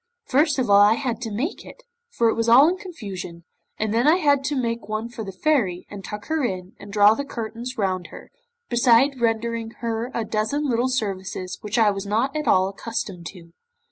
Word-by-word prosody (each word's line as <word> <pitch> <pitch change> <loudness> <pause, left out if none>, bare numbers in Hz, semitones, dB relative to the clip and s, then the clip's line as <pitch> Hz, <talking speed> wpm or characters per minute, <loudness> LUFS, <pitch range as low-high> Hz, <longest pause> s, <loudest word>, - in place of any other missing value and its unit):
First 290 +2 +2
of 260 - 0
all 200 0 +6
I 210 +2 +6
had 240 -3 -3
to 225 -2 -4
make 255 - -3
it, - - -14 0.3
for 235 - +1
it 225 - +3
was 230 0 0
all 265 +6 +8
in 350 - +1
confusion, 200 - -8 0.3
and 215 0 -1
then 235 +5 +2
I 315 - +6
had 285 -6 +2
to 290 +2 -1
make 230 -4 -2
one 215 +2 -3
for 235 -2 -7
the 195 - -6
Fairy, 190 - 0
and 200 -1 -8
tuck 210 +1 -7
her 315 -2 -1
in, 185 -5 -3
and 205 - -11
draw 205 +1 +6
the 280 - -3
curtains 235 -1 -6
round 185 -4 -1
her, - - -13 0.4
beside 245 +2 +3
rendering 230 0 0
her 230 0 -2
a 230 - -1
dozen 220 +8 -1
little 245 0 +1
services 195 -6 -3
which 210 +1 -3
I 220 -3 +5
was 195 0 -5
not 230 +8 0
at 305 0 -2
all 185 0 +4
accustomed 195 -4 -5
to. 170 -3 -13
230 Hz, 210 wpm, -23 LUFS, 205-260 Hz, 0.4 s, all